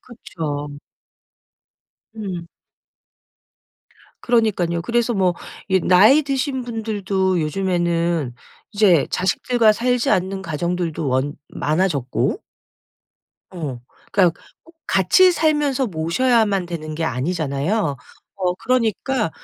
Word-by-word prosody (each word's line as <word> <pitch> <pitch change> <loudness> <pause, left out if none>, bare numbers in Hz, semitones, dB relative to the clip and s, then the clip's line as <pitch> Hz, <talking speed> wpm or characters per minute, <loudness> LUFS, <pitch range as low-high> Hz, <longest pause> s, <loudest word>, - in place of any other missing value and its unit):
그쵸. 150 - -6 1.4
음. 190 -6 -5 1.8
그러니깐요. 195 -8 +1
그래서 235 +4 0
뭐 185 -3 +2 0.3
이 190 -1 +3
나이 210 - +6
드신 270 -1 -2
분들도 200 -5 -1
요즘에는 170 -4 -1 0.4
이제 195 -8 +4
자식들과 220 +4 +2
살지 245 +2 0
않는 190 +1 0
가정들도 170 -1 -2
원 130 +3 0
많아졌고 150 -5 -1 1.1
어. 150 -9 -5 0.3
그러니까 180 -4 +2 0.2
꼭 330 +1 -21
같이 275 - +4
살면서 295 -5 +1
모셔야만 200 +3 +1
되는 155 -3 -6
게 160 +1 -2
아니잖아요. 150 - -1 0.4
어 180 -2 0
그러니까 245 -1 0
185 Hz, 220 characters per minute, -21 LUFS, 165-230 Hz, 1.8 s, 나이